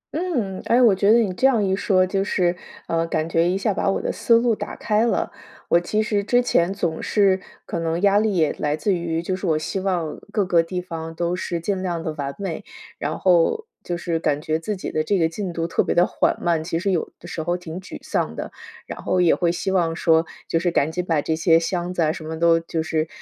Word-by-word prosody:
嗯， 255 - -2
哎， 240 - +4
我 235 -5 +6
觉 200 +2 +3
得 230 - +7
你 215 -6 +1
这 260 +8 +3
样 230 -6 +2
一 190 0 +1
说， 185 -2 +2
就 195 +1 -1
是， 180 -3 +1 0.3
呃， 165 0 0
感 160 -1 -1
觉 165 +1 +2
一 185 - 0
下 205 +1 0
把 195 - 0
我 195 - 0
的 - - -2
思 235 - +3
路 235 0 +2
打 - - -6
开 215 0 +1
了。 - - 0 0.4
我 170 - +5
其 210 +5 0
实 210 -2 0
之 245 +4 +3
前， 185 -7 +2
总 170 -5 -2
是 195 -3 +2 0.2
可 170 - -3
能 165 +1 -1
压 200 0 +5
力 215 -2 +1
也 160 -4 +2
来 150 0 0
自 200 +5 +1
于， 170 -2 -2
就 185 +2 -1
是 190 0 -4
我 160 -2 +2
希 155 +5 -3
望 180 -5 -2
各 205 -3 +1
个 175 -2 +4
地 180 +2 -4
方 165 -2 -6
都 175 +1 -1
是 175 -1 -3
尽 190 +3 -2
量 175 -3 -2
地 160 - -3
完 140 -2 -4
美。 195 -5 -4 0.4
然 150 +2 -2
后 185 - +3 0.2
就 175 - -3
是 170 -1 -2
感 145 -3 0
觉 155 +1 -1
自 200 +5 -3
己 - - -5
的 155 - 0
这 195 +5 +1
个 165 -3 +3
进 185 +3 -4
度 165 -1 -2
特 165 - +1
别 - - -1
地 175 +1 +5
缓 - - 0
慢。 170 -2 0
其 165 0 -2
实 195 +4 0
有 175 - -1
的 175 - -11
时 165 - -4
候 175 +3 -1
挺 175 0 -7
沮 190 - -8
丧 - - -2
的， - - -5 0.3
然 - - -8
后 185 - 0
也 175 -2 +5
会 170 -2 +1
希 190 +2 -2
望 170 -3 +1
说， 165 0 +3 0.2
就 165 - +1
是 175 +1 +1
赶 160 -2 +1
紧 180 +2 -2
把 165 -5 0
这 160 - 0
些 165 0 +4
箱 175 +1 -2
子 180 -2 0
啊 155 - +2
什 160 - -7
么 160 +1 -5
都 165 0 +4
就 165 -1 -3
是， 160 0 -1
175 Hz, 275 characters per minute, -22 LUFS, 165-195 Hz, 0.4 s, 得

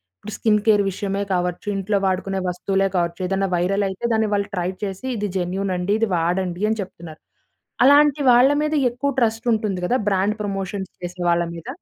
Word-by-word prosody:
ఇప్పుడు 215 - -9
skin 210 -2 +2
care 210 -2 +4
విషయమే 200 +1 -3
కావచ్చు 180 +1 -2
ఇంట్లో 200 +1 0
వాడుకునే 190 +1 -1
వస్తువులే 195 +2 0
కావచ్చు 170 0 -1
ఏదైనా 195 +1 0
వైరలయితే 195 +4 -1
దాన్ని 220 -1 +2
వాళ్ళు 200 0 0
ట్రై 180 0 -1
చేసి 195 +5 -5
ఇది 210 -1 -2
జెన్యూన్ 190 +2 -1
అండి 180 +3 0
ఇది 225 - +2
వాడండి 175 +2 -1
అని 220 0 -1
చెప్తున్నారు. 170 -4 -10 0.6
అలాంటి 290 +1 +5
వాళ్ళ 245 +3 +6
మీద 305 0 -1 0.2
ఎక్కువ 280 +3 -2
ట్రస్ట్ 225 0 0
ఉంటుంది 215 -4 -1
కదా! 245 - +1
బ్రాండ్ 200 +3 +1
ప్రమోషన్స్ 195 -1 -4
చేసే 180 0 -6
వాళ్ళ 170 0 +2
మీద? 165 - -10
195 Hz, 175 wpm, -22 LUFS, 180-215 Hz, 0.6 s, వాళ్ళ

